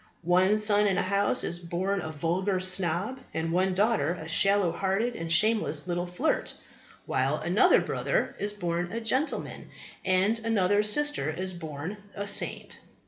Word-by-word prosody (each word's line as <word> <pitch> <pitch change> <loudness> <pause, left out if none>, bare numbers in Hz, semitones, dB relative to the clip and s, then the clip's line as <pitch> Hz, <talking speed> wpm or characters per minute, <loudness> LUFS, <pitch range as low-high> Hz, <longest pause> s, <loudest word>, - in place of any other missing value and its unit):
One 185 +4 +3
son 210 -1 +5
in 195 - 0
a - - +1
house 200 +2 +1
is 175 - -1
born 180 +3 -3
a 160 - -6
vulgar 180 +5 -1
snob, 185 +5 0 0.2
and 160 0 -2
one 185 +2 +1
daughter 200 -6 +1
a 160 -3 -9
shallow 195 +2 +3
hearted 195 +7 -1
and 165 -4 -5
shameless 185 -5 +2
little 175 0 -2
flirt; 180 - -2 0.5
while - - 0
another - - +3
brother - - -2
is 205 +1 -2
a 210 - -14
born 175 +3 -3
gentleman, 260 +7 -2 0.3
and 190 +4 +1
another 205 -3 +1
sister 210 - +3
a 185 +1 -3
born 160 +3 -7 0.3
saint. 205 - -2
190 Hz, 150 wpm, -27 LUFS, 175-210 Hz, 0.5 s, son